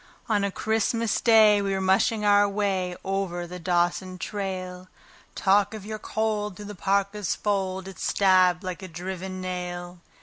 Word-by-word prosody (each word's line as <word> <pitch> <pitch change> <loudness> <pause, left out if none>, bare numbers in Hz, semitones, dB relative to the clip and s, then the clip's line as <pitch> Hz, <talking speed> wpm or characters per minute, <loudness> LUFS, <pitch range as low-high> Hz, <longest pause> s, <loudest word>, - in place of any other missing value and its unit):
On 210 -3 +1
a 200 - +1
Christmas 220 +2 0
Day 215 -3 +6
we 195 -1 -1
were 190 - -1
mushing 195 +3 +2
our 205 0 +5
way 195 -3 -1
over 190 -2 -2
the 180 +1 -8
Dawson 175 +1 0
trail. 185 -2 -5 0.5
Talk 200 +2 +2
of 210 -2 -8
your 215 0 -5
cold! 210 -2 -2
through 210 - -9
the 210 - -7
parka's 200 +1 0
fold 190 -2 -2
it 195 - -10
stabbed 185 -2 +3
like 185 -1 -5
a 190 - -7
driven 185 +2 -6
nail. 180 -1 -5
190 Hz, 160 wpm, -26 LUFS, 185-205 Hz, 0.5 s, Day